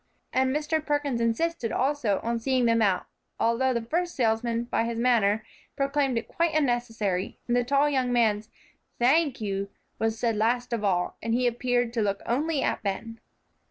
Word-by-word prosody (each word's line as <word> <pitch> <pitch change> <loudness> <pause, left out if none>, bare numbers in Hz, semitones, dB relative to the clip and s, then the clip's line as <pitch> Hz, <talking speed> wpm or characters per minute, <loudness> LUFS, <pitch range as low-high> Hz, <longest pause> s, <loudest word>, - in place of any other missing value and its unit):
And 260 0 +2
Mr. 300 +2 0
Perkins 290 -5 -1
insisted, 230 +2 0
also, 260 -7 +1
on 235 0 -1
seeing 255 +1 +1
them 230 0 +3
out, 195 -4 +2 0.3
although 235 +3 +2
the 235 -2 -1
first 345 +8 -2
salesman, 230 -1 +1
by 240 - 0
his 230 0 -3
manner, 225 -3 +2 0.3
proclaimed 275 -2 0
it 230 - -3
quite 335 -2 0
unnecessary, 225 -9 0
and 240 - +1
the 245 - +3
tall 280 +4 +3
young 260 -4 +1
man's 220 -3 +2 0.5
"Thank 270 +1 +2
you" 200 -1 -2 0.3
was 225 0 0
said 230 -1 0
last 240 +3 0
of 225 -2 -2
all, 180 -3 0
and 230 +1 0
he 250 +1 +1
appeared 245 0 0
to 235 - 0
look 200 -1 -1
only 290 +4 0
at - - -1
Ben. 220 +3 -4
240 Hz, 175 wpm, -27 LUFS, 225-270 Hz, 0.5 s, them